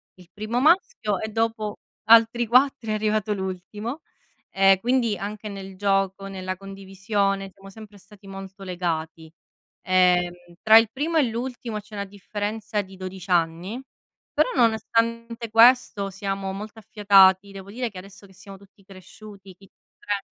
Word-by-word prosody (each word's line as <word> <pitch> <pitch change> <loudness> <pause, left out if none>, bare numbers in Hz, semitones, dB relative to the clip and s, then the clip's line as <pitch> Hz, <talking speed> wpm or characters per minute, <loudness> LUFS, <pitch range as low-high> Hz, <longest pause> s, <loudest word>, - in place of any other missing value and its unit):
il 180 -2 -18
primo 215 +3 -3
maschio 305 - +2
e 220 - -4
dopo 225 -1 -2 0.3
altri 230 +1 +5
4 255 0 +3
è - - 0
arrivato 215 0 0
l'ultimo. 200 - -6 0.5
Ehm, 195 0 +4
quindi 240 -1 +1
anche 210 +1 -6
nel 195 -1 -9
gioco, 195 -1 0
nella 185 -1 -5
condivisione 195 0 -3
siamo 195 0 -14
sempre 210 0 -13
stati 205 +1 -19
molto 195 0 -10
legati. 165 -3 -4 0.5
Ehm, 180 -1 +3 0.3
tra 220 0 +8
il 225 -1 0
primo 310 +6 -2
e 310 - +5
l'ultimo 235 -1 -5
c'è 210 +1 -17
una 200 -1 -4
differenza 205 +2 -4
di 190 -1 -13
12 185 0 -8
anni, 175 +5 0 0.6
però - - +3
nonostante 230 0 0
questo 225 -3 +4
siamo 195 0 -4
molto 210 +3 -8
affiatati. 200 -2 +4
Devo 195 0 -10
dire 245 +2 -3
che 195 - -13
adesso 195 +2 -12
che 190 - -20
siamo 195 +2 -12
tutti 200 0 -22
cresciuti, 195 0 -14
chi 195 +2 -19 0.3
tre 205 -1 -3
200 Hz, 145 wpm, -24 LUFS, 190-220 Hz, 0.6 s, tra